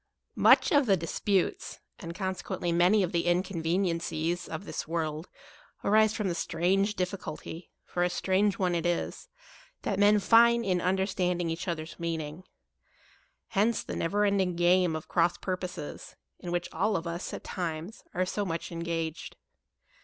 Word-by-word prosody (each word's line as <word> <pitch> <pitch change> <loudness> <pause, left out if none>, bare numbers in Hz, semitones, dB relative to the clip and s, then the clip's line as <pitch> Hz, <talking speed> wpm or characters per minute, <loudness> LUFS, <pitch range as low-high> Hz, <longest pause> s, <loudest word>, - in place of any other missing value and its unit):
MUCH - - +5
of 285 -4 +4
the 195 -2 +4
disputes, 180 +3 -1 0.2
and 170 0 -7
consequent 190 -1 -4
ly 175 - +1
many 180 +5 +4
of 180 - -1
the 170 -1 0
inconveniencies, 175 -1 0
of 165 +5 -5
this - - -5
world, 160 0 -3 0.5
arise 215 +1 +4
from 210 - -1
the 175 - 0
strange 190 +5 +1
difficulty 180 -2 -5 0.2
(for 175 - -3
a 180 - +3
strange 195 +3 +1
one 185 -4 +1
it 170 0 0
is) 175 - -2 0.6
that 195 - -1
men 205 +1 +6
find 235 +3 +5
in 180 -2 +1
understanding 180 -2 0
each 170 +4 -4
other's 160 -2 -4
meaning. 165 0 -4 1.1
Hence 215 +3 +1
the - - -5
never 205 +5 +1
ending 190 -3 +1
game 175 -1 +3
of 155 - -6
cross 170 -1 +2
purposes, 185 -5 -5 0.2
in 175 - -6
which 175 0 -1
all 205 +6 +1
of 165 - -5
us, 170 +2 -4
at - - -7
times, 170 +3 -5
are 185 +1 +1
so 205 +3 -2
much 170 -3 -4
engaged. 165 -1 -4
180 Hz, 155 wpm, -29 LUFS, 170-195 Hz, 1.1 s, men